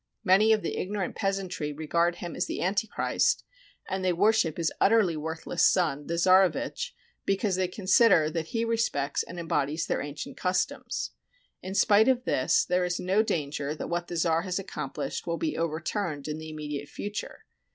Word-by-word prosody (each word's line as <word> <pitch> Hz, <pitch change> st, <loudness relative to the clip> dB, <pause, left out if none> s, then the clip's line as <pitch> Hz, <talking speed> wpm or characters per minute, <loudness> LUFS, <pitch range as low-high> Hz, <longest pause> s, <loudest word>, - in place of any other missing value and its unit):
Many 205 Hz, +3 st, +5 dB
of 215 Hz, -1 st, +3 dB
the -, -, -3 dB
ignorant 195 Hz, 0 st, -3 dB
peasantry 185 Hz, -6 st, -2 dB
regard 170 Hz, +3 st, 0 dB
him 175 Hz, -1 st, -7 dB
as -, -, -1 dB
the -, -, -4 dB
Antichrist, 205 Hz, -, +1 dB, 0.4 s
and 190 Hz, 0 st, -3 dB
they 185 Hz, -, +3 dB
worship 200 Hz, -3 st, +2 dB
his 165 Hz, -2 st, 0 dB
utterly 205 Hz, -5 st, +4 dB
worthless 160 Hz, +2 st, -3 dB
son, 155 Hz, -7 st, +2 dB
the 170 Hz, -, -2 dB
czarevitch, 190 Hz, -, +2 dB, 0.3 s
because 195 Hz, 0 st, 0 dB
they 185 Hz, 0 st, +1 dB
consider 190 Hz, -2 st, +4 dB
that 160 Hz, 0 st, -3 dB
he 230 Hz, +4 st, -1 dB
respects 220 Hz, -12 st, 0 dB
and 175 Hz, -, -7 dB
embodies 155 Hz, -1 st, -1 dB
their -, -, -1 dB
ancient 145 Hz, +1 st, -7 dB
customs. 180 Hz, 0 st, -1 dB, 0.5 s
In 190 Hz, +1 st, -6 dB
spite 210 Hz, +2 st, +5 dB
of 255 Hz, -2 st, +3 dB
this 130 Hz, -, +2 dB
there 180 Hz, 0 st, +1 dB
is 180 Hz, 0 st, -1 dB
no 190 Hz, +4 st, +2 dB
danger 150 Hz, -8 st, -2 dB
that -, -, -6 dB
what 175 Hz, 0 st, -2 dB
the 175 Hz, -, -5 dB
czar 165 Hz, 0 st, +2 dB
has 180 Hz, 0 st, -3 dB
accomplished 150 Hz, -8 st, -5 dB
will 170 Hz, 0 st, -1 dB
be 315 Hz, -, -2 dB
overturned 165 Hz, -1 st, -2 dB
in 155 Hz, 0 st, -4 dB
the 160 Hz, 0 st, -8 dB
immediate 150 Hz, -2 st, -5 dB
future. 205 Hz, +1 st, -6 dB
180 Hz, 170 wpm, -28 LUFS, 160-200 Hz, 0.5 s, Many